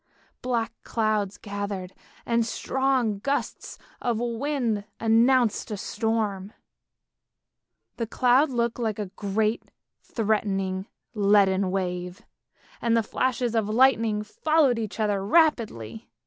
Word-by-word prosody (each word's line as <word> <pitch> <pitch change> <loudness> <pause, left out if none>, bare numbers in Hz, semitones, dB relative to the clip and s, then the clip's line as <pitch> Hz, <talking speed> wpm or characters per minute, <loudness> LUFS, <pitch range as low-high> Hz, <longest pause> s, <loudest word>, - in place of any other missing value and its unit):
Black 235 -2 -1
clouds 215 -3 -1
gathered, 200 -3 -5 0.3
and 235 0 +2
strong 255 -3 0
gusts 275 +7 -3 0.2
of 235 -3 0
wind 240 -2 -1 0.2
announced 230 +1 +3
a 210 - -4
storm; 210 -2 -2 1.4
the 230 - -2
clouds 255 +5 +3
looked 235 -1 -1
like 220 -3 -1
a 205 -3 -5
great 215 +2 0 0.4
threatening 195 -3 -1 0.3
leaden 200 -2 +3
wave, 180 -1 -3 0.6
and 230 -1 +2
the 225 - +2
flashes 245 +1 -1
of 220 -2 0
lightning 225 -3 +3
followed 280 +2 +2
each 220 0 -5
other 205 -3 0
rapidly. 205 - +1
220 Hz, 105 wpm, -26 LUFS, 200-240 Hz, 1.4 s, announced